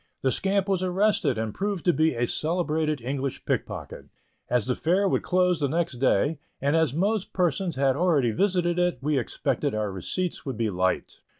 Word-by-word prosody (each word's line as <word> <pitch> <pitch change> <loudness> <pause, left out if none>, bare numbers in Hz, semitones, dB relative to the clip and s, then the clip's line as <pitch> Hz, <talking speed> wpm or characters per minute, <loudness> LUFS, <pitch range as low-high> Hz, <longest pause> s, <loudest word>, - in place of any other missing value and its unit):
The 130 - +3
scamp 195 +4 +1
was 190 -2 +1
arrested, 185 - +1
and 110 -1 -2
proved 200 -3 -3
to 175 - +4
be 160 -3 +2
a 120 +1 +1
celebrated 155 -1 -1
English 135 +2 -3
pickpocket. - - -4 0.4
As 125 -3 +1
the 125 0 0
Fair 185 +5 +2
would - - +1
close 180 -1 +2
the 145 - +1
next 165 -3 -1
day, 140 +4 +2 0.2
and 140 +3 +1
as 160 -5 +3
most 200 +7 -1
persons 175 -1 0
had 135 -1 +2
already 150 -7 +2
visited 180 - +1
it, 175 -4 +1
we 145 +1 +1
expected 115 - -2
our 105 -2 -1
receipts 170 - -3
would 135 -6 -5
be 115 -2 0
light. 95 0 -1
160 Hz, 185 wpm, -26 LUFS, 130-180 Hz, 0.4 s, to